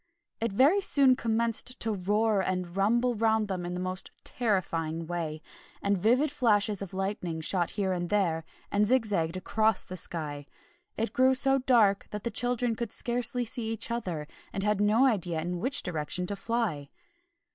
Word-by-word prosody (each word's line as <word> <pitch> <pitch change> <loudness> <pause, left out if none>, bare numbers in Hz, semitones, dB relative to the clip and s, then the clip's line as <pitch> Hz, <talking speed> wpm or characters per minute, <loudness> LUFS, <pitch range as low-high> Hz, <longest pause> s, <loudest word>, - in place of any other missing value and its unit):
It 230 -1 -1
very 285 - +4
soon 275 -9 +4
commenced 235 +1 0
to 225 -1 -1
roar 205 +2 +1
and 180 -2 -3
rumble 235 +5 +2
round 220 -1 +1
them 180 -3 -3
in 180 0 -4
a - - -4
most 185 +1 -4
terrifying 165 -8 -1
way, 160 -2 -4 0.4
and 200 0 +1
vivid 245 +10 +2
flashes 210 -6 +2
of 195 -1 -6
lightning 190 -4 -3
shot 175 +2 0
here 190 -2 +1
and 175 -1 -3
there 175 -6 +1 0.3
and 205 +1 +2
zig 255 0 +3
zagged 170 -4 -1
across 215 +2 +1
the 185 - -7
sky. 150 -5 -3 0.5
It 225 +1 -2
grew 260 +1 +4
so 270 0 +3
dark 225 -6 +3
that 210 -1 -6
the 235 - -2
children 245 +1 0
could 230 -1 -4
scarcely 245 +1 -1
see 225 0 0
each 225 +1 -4
other, 180 -10 -3 0.3
and 195 - -3
had 210 -1 +1
no 215 +5 +4
idea 180 -10 +1
in 175 +2 -3
which 270 +8 0
direction 175 +1 -2
to 200 - -2
fly. 195 -9 -2
205 Hz, 175 wpm, -29 LUFS, 180-235 Hz, 0.5 s, very